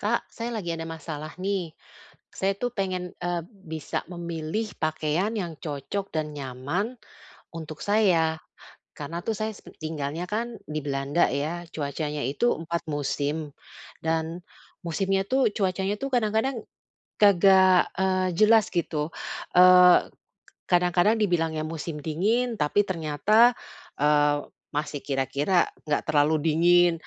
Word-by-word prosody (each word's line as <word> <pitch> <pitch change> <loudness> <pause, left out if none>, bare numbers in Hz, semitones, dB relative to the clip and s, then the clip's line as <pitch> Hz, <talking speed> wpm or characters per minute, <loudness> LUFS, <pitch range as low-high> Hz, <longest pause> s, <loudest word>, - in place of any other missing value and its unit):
Kak, 225 +3 0
saya 235 +1 -4
lagi 175 -6 -3
ada 165 - -5
masalah 155 -1 -7
nih. 190 -3 -2 0.6
Saya 195 +1 0
tuh 245 +1 -2
pengen, 185 -3 -3
e 175 - -2 0.2
bisa 165 -7 -6
memilih 170 +4 -4
pakaian 155 +5 0
yang 175 -6 -3
cocok 155 +7 -4
dan 155 -1 -2
nyaman 145 - -3 0.6
untuk 155 -2 -7
saya, 175 -7 +2 0.6
karena 160 +4 -5
tuh 225 - -1
saya 215 +2 -2
s - - -15 0.2
tinggalnya 155 +1 -4
kan 230 +3 -3
di 155 0 -3
Belanda 140 +3 +1
ya, 155 +5 -2
cuacanya 150 0 -3
itu 145 - +1
4 170 +1 -4
musim 145 +1 -2 0.5
dan 165 +2 -1 0.4
musimnya 195 +3 0
tuh 260 -1 +3
cuacanya 190 0 0
tuh 275 - -3
kadang-kadang 225 +1 0 0.6
kagak, 190 -2 +6
eee, 185 -1 +1
jelas 215 0 +5
gitu, 160 -3 -1 0.5
eee, 180 0 +8 0.7
kadang-kadang 180 +4 +3
dibilangnya 165 -5 0
musim 160 -1 -5
dingin 220 +10 0
tapi 150 +8 +3
ternyata, 190 +8 +3 0.5
eee, 145 0 +3 0.3
masih 145 -1 -3
kira-kira 140 +6 +1 0.2
enggak 150 - 0
terlalu 155 +1 +3
dingin. 175 +2 +4
170 Hz, 120 wpm, -26 LUFS, 155-195 Hz, 0.7 s, eee